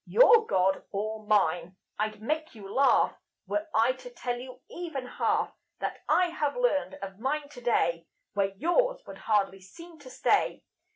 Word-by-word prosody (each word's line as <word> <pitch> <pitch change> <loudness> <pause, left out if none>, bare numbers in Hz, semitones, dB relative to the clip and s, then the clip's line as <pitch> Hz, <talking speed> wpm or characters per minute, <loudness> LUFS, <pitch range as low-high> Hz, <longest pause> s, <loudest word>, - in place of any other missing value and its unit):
Your 465 -2 +6
God, 190 +1 +2
or 215 +1 -4
mine? 180 -4 +2 0.2
I'd 215 0 -2
make 310 +2 -2
you 205 -3 -10
laugh 275 +1 +4 0.3
Were 315 +1 -2
I 230 0 +4
to 255 -1 -9
tell 245 0 -3
you 255 0 -10
even 325 -7 -5
half 250 - 0 0.2
That - - -4
I 360 0 +4
have 300 -1 -2
learned 390 -14 +1
of 195 0 -7
mine 285 +4 -2
today 225 - 0 0.3
Where 200 -1 +1
yours - - +1
would - - -10
hardly 195 -3 +1
seem 335 - -13
to 275 -3 -12
stay. - - +1
250 Hz, 160 wpm, -28 LUFS, 205-315 Hz, 0.3 s, Your